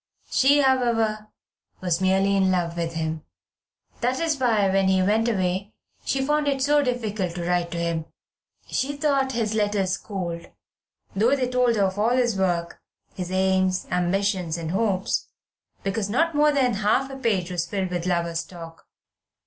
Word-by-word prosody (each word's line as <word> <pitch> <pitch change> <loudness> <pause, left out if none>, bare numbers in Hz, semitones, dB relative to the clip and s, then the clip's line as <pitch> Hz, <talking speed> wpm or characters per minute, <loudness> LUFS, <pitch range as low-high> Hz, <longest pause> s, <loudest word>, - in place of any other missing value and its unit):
She, 285 +2 +4
however, 230 -5 +1 0.5
was 180 -1 -1
merely 195 +1 +2
in 190 -1 +3
love 175 -2 0
with 170 -1 -3
him. 160 -1 -3 0.8
That 250 +2 0
was 320 -4 0
why, 225 -6 +3
when 195 0 +2
he 190 0 +3
went 220 +4 +2
away, 190 0 -1 0.3
she 270 0 0
found 295 +1 +1
it 270 -2 +1
so 290 +1 +4
difficult 215 -9 -2
to 175 -1 -4
write 175 -1 +1
to 170 - -5
him. 170 -1 -2 0.6
She 285 +2 -2
thought 275 -3 +1
his 225 -2 -1
letters 205 -3 0
cold, 175 -5 -5 0.7
though 230 +7 +3
they 260 -2 -1
told 250 -1 +2
her 205 - +2
of 190 +1 -1
all 230 +4 +2
his 240 -4 +2
work, 175 -3 -1 0.3
his 180 -1 -5
aims, 185 0 +1
ambitions, 180 -1 0
hopes, 190 +4 -1 0.6
because 200 +1 -2
not 330 +9 +1
more 300 0 +4
than 260 -4 +2
half 260 +6 +1
a - - -6
page 200 -9 -1
was 170 -1 -2
filled 190 -2 -2
with 175 0 -2
lover's 170 -1 0
talk. 165 -1 -12
195 Hz, 165 wpm, -24 LUFS, 180-245 Hz, 0.8 s, She